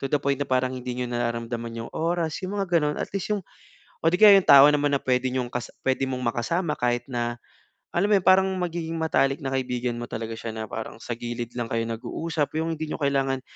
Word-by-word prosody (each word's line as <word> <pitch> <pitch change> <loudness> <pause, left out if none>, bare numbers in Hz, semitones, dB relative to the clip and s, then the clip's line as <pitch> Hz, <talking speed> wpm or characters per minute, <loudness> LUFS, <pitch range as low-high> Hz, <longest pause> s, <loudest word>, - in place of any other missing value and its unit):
to - - -5
the 145 - +2
point 140 -1 +1
na - - +1
parang 130 0 +1
hindi 125 0 -5
niyo 125 - -1
nararamdaman 115 -1 -3
'yung 115 - -7
oras, 165 -1 -1
'yung 200 +2 -3
mga 180 -3 +1
gano'n. 150 -1 -1
At - - -3
least 195 +2 -2
'yung 205 - 0 0.6
oh - - +3
'di 180 - +1
kaya 210 -2 +10
'yung 190 - -8
tao 140 0 +10
naman 145 0 +2
na - - +4
puwede 130 0 +1
niyong 125 -1 -2
kas 125 -2 -3 0.2
puwede 135 0 +1
mong 130 -1 -3
makasama 165 +7 -1
kahit 120 0 0
na, 120 -1 -2 0.6
alam 190 +4 +1
mo - - +5
'yon, 185 - -9
parang 190 0 +7 0.2
magiging 165 -1 -3
matalik 140 -2 +1
na 135 - -3
kaibigan 125 -2 -2
mo 120 - -4
talaga 115 0 -4
siya 115 0 -6
na 110 - -4
parang 110 0 -7
sa 120 -1 -5
gilid 120 0 -5
lang 115 -1 -2
kayo 115 0 0
nag-uusap, 150 +7 -3
'yung 165 +1 -1
hindi 155 0 -4
n'yo - - -5
kailangan 135 -2 +1
135 Hz, 235 wpm, -25 LUFS, 120-160 Hz, 0.6 s, kaya